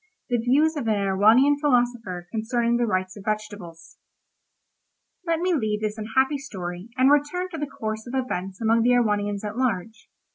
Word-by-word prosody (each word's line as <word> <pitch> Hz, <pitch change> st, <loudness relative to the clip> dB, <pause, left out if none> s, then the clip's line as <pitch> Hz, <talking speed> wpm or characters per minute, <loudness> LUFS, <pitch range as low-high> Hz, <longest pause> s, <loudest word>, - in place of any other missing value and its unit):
THE 245 Hz, -, +2 dB
VIEWS 290 Hz, +7 st, +2 dB
OF 240 Hz, -, -3 dB
AN 215 Hz, -, +2 dB
EREWHONIAN 215 Hz, +8 st, +4 dB
PHILOSOPHER 240 Hz, -, 0 dB
CONCERNING 235 Hz, +1 st, 0 dB
THE 240 Hz, -1 st, +1 dB
RIGHTS 185 Hz, -1 st, -2 dB
OF 200 Hz, -, -10 dB
VEGETABLES 205 Hz, -6 st, -6 dB, 1.3 s
Let 330 Hz, -1 st, +1 dB
me 365 Hz, 0 st, +1 dB
leave 215 Hz, -8 st, -1 dB
this 215 Hz, 0 st, -3 dB
unhappy 265 Hz, +6 st, +1 dB
story, 185 Hz, -6 st, -7 dB
and 260 Hz, +2 st, +5 dB
return 295 Hz, +6 st, +1 dB
to 325 Hz, -, -7 dB
the 295 Hz, -, -2 dB
course 220 Hz, -2 st, -5 dB
of 245 Hz, -, -5 dB
events 195 Hz, -8 st, -3 dB
among 230 Hz, 0 st, +2 dB
the 245 Hz, +2 st, +4 dB
Erewhonians 205 Hz, -3 st, +1 dB
at 210 Hz, +2 st, -5 dB
large. 225 Hz, -3 st, -2 dB
225 Hz, 170 wpm, -24 LUFS, 205-260 Hz, 1.3 s, and